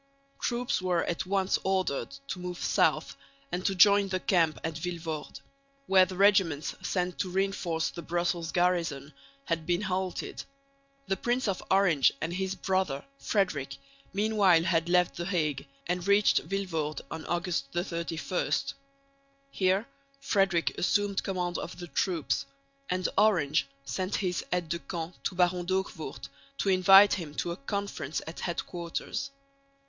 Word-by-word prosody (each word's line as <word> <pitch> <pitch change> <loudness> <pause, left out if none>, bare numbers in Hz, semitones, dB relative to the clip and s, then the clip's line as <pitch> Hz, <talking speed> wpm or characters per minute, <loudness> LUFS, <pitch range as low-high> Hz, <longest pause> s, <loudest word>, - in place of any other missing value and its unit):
Troops 240 -4 0
were 180 -2 +1
at 175 +2 -2
once 190 -1 +1
ordered 190 -7 0 0.2
to 185 - -3
move 180 -1 -5
south - - +1 0.4
and 180 +1 -2
to 195 - 0
join 200 +1 +6
the 185 -1 -1
camp 170 -4 +2
at 160 - -2
Vilvoorde, 165 -3 -5 0.4
where 190 -4 +6
the 185 - -7
regiments 190 -7 +3
sent 180 -1 -2
to 185 - -1
reinforce 185 -3 -1
the 170 - -7
Brussels 170 0 -1
garrison 170 -6 0 0.3
had 165 -2 -2
been 175 +1 +1
halted. 190 -1 -3 0.6
The 195 - -1
Prince 240 +4 0
of 195 -2 -1
Orange 190 -8 +4
and 165 +2 -3
his 190 +1 -2
brother 185 -7 -1
Frederick 185 -10 -1 0.3
meanwhile 200 -4 +4
had 170 -1 +1
left 180 0 +3
the 170 - -3
Hague 155 -7 -1 0.2
and 180 +1 -2
reached 200 +1 +5
Vilvoorde 165 -7 -2
on 160 - -5
August 175 -5 -1
31. 170 0 -2 1.0
Here 190 +3 +2 0.3
Frederick 195 -9 +1
assumed 200 +1 +1
command 180 -2 -2
of - - -6
the 175 - -6
troops; 175 -1 -1 0.4
and 180 0 0
Orange 155 -10 +3 0.2
sent 185 +7 -2
his 180 -3 -1
aide 175 -2 -1
de 170 +1 -1
camp 170 -1 -6
to 185 - -1
Baron 180 -1 +2
D'Hoogvoort 180 -7 -3 0.3
to 200 - 0
invite 195 +2 +7
him 155 -5 -4
to 170 - -2
a - - -3
conference 200 0 -3
at 160 - -8
headquarters. 175 +9 -4
180 Hz, 145 wpm, -29 LUFS, 165-195 Hz, 1.0 s, invite